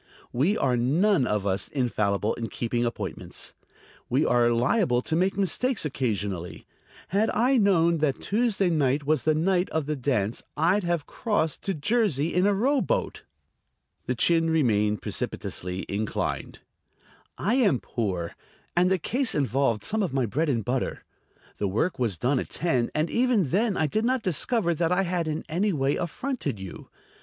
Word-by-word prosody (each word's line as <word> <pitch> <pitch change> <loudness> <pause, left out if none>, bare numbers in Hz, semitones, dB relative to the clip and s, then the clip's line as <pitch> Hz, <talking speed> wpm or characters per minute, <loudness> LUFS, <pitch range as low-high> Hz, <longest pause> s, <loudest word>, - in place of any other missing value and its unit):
"We 155 - +2
are 130 -2 +1
none 145 - +2
of 105 -2 -1
us 95 0 0
infallible 105 -5 0
in 115 -1 -4
keeping 120 +3 -2
appointments. 120 - -5 0.6
We 140 +5 +2
are 120 -1 +3
liable 125 - +2
to 160 - -1
make 185 +3 +1
mistakes 215 +3 0
occasionally. 100 - -3 0.4
Had 210 +4 +2
I 255 +4 +2
known 170 -6 +3
that 145 -3 0
Tuesday 205 -4 +1
night 145 -2 +1
was 155 -2 +2
the 155 +4 +2
night 180 +3 +1
of 160 -2 -1
the 150 +1 -2
dance 120 -6 -1 0.2
I'd 180 +6 +2
have 170 -4 -1
crossed 205 -9 -1
to 195 - -1
Jersey 170 - +1
in 180 +3 +3
a 205 - +3
rowboat." 280 - 0 0.9
The - - 0
chin 165 -1 +3
remained 105 - +1
precipitously 90 +1 -4
inclined. 105 +2 -3 0.8
"I 210 - 0
am 200 - +3
poor, 95 -7 -3 0.4
and 180 +1 +4
the 190 - +3
case 250 - 0
involved 135 -6 +1
some 220 +1 -1
of 175 -9 -2
my 130 -2 +2
bread 150 +9 -1
and 115 -6 0
butter. 125 +1 -2 0.5
The 100 - -1
work 115 - -1
was 115 -8 0
done 130 - +1
at - - -5
ten, 130 -8 0
and 155 +2 0
even 235 - +2
then 205 - +1
I 160 - +2
did 215 +9 0
not 255 -1 +1
discover 185 - +1
that 165 +1 0
I 185 +2 +3
had 175 -2 -1
in 155 0 -2
any 185 +6 0
way 140 -4 +1
affronted 175 - -3
you. 95 -2 -9
155 Hz, 165 wpm, -26 LUFS, 120-195 Hz, 0.9 s, and